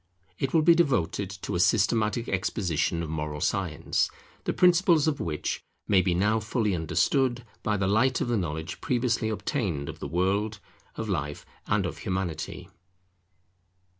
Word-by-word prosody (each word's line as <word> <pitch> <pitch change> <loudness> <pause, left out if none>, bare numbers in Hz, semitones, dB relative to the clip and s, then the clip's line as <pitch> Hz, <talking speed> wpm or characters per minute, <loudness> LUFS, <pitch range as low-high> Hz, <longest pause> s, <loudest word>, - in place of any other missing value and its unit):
It 135 - -1
will 160 -2 +4
be 170 +2 +7
devoted 125 - +1
to - - -3
a 90 - 0
systematic 110 +3 +2
exposition 90 -3 0
of 80 - -5
Moral 75 -1 -3
Science, - - 0 0.4
the - - +1
principles 175 -3 +4
of 150 -3 0
which 75 -3 -2 0.3
may 100 -3 +5
be 90 -1 +1
now 105 +5 +2
fully 110 -1 0
understood 120 - +1 0.2
by 105 -1 0
the 95 - 0
light 110 +7 +3
of - - -1
the 120 - +1
knowledge 80 -3 -3
previously 120 -3 0
obtained 100 - -2
of - - -8
the - - -4
World, 100 +7 0 0.4
of 110 - -4
Life, 75 -7 -3 0.2
and - - +1
of - - -5
Humanity. 90 -4 -3
105 Hz, 155 wpm, -27 LUFS, 85-120 Hz, 0.4 s, be